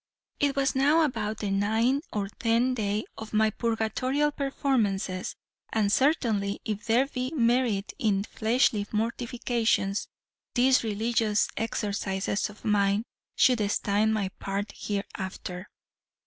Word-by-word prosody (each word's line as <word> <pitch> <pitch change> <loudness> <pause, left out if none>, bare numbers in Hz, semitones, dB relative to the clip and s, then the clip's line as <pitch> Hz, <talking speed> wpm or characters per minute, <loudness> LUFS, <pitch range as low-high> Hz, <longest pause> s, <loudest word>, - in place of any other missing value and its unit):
"It 285 -1 +2
was 275 -1 +1
now 290 +5 +4
about 220 -7 -1
the 205 -2 -3
ninth 225 - +1
or 205 -2 -2
tenth 235 +4 +1
day 210 0 -1
of 220 0 -8
my 215 0 +3
purgatorial 235 +6 0
performances; 230 -10 -1 0.4
and 210 -2 +1
certainly, 225 -8 +2
if 210 0 -3
there 235 +3 +3
be 255 -2 -3
any 315 - -4
merit 235 -4 +1
in 200 -3 +1
fleshly 220 -1 +1
mortifications, 230 -2 0 0.5
these 255 0 +4
religious 220 0 +1
exercises 205 -3 -1
of 210 - -14
mine 205 0 +2 0.3
should 250 -4 +4
stand 205 +2 +1
my 205 -3 0
part 200 +1 -3
hereafter. 190 -2 -5
220 Hz, 120 wpm, -27 LUFS, 205-250 Hz, 0.5 s, now